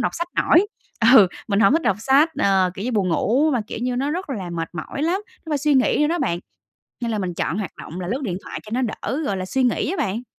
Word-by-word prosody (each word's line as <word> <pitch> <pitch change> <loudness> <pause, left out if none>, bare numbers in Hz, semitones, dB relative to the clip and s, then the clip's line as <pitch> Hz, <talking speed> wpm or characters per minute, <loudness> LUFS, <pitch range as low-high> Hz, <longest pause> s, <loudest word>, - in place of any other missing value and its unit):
đọc - - 0
sách 340 +1 -3
nổi, 360 +5 +4 0.5
ừ, 205 -7 +9 0.2
mình 200 0 +2
hổng 200 +1 +5
thích 325 +2 +2
đọc 195 - +2
sách. 275 +7 +4
Ờ, 190 -6 +3
kiểu 200 - -6
như, 250 - -1
buồn 195 -4 +1
ngủ 260 - +2
mà, 245 - +1
kiểu - - -6
như, 250 0 -1
nó 275 +3 0
rất 340 -1 -4
là 190 -8 -4
mệt 165 -1 -3
mỏi 175 - -5
lắm, 355 +5 +1 0.3
nó - - -6
phải 295 - +1
suy 295 0 +2
nghĩ 260 - +3
nữa 300 - +4
đó 345 +1 0
bạn, 215 - 0 0.6
nên 235 -1 -2
là 215 - -1
mình 180 -3 -3
chọn 175 - -2
hoạt 195 -6 -3
động 175 +4 -8
là 175 - -4
lướt 260 +6 -2
điện 185 -8 -2
thoại - - -6
cho 215 - -13
nó 260 - 0
đỡ, 265 +5 -3
gọi 200 -5 -1
là, 185 - -3
suy 260 +8 0
nghĩ 250 +5 +1
á 385 - -2
bạn. 225 +6 -4
240 Hz, 285 wpm, -22 LUFS, 190-290 Hz, 0.6 s, ừ